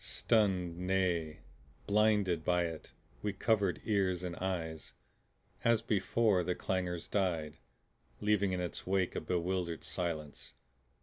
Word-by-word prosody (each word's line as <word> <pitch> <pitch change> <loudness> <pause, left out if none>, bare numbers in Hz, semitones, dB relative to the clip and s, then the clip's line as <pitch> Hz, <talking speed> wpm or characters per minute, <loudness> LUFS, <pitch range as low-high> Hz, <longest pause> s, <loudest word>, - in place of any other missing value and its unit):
Stunned, 95 -6 +1
nay 90 -4 0 0.4
BLINDED, 105 -5 +3
by 90 +1 +2
it, 80 -2 -6 0.3
we 105 -1 -1
covered 100 -2 +1
ears 95 -4 +1
and 90 -1 -3
eyes. 80 -4 -3 0.7
As 115 -1 +3
before, 105 -2 +2
the 90 +1 -1
clangor 90 -2 -1
died, 85 -7 0 0.6
leaving 105 -2 +2
in 90 - -1
its 90 0 -5
wake 95 -1 +1
a - - -1
bewildered 90 -1 -1
silence. 80 -4 -4
90 Hz, 120 wpm, -33 LUFS, 85-100 Hz, 0.7 s, BLINDED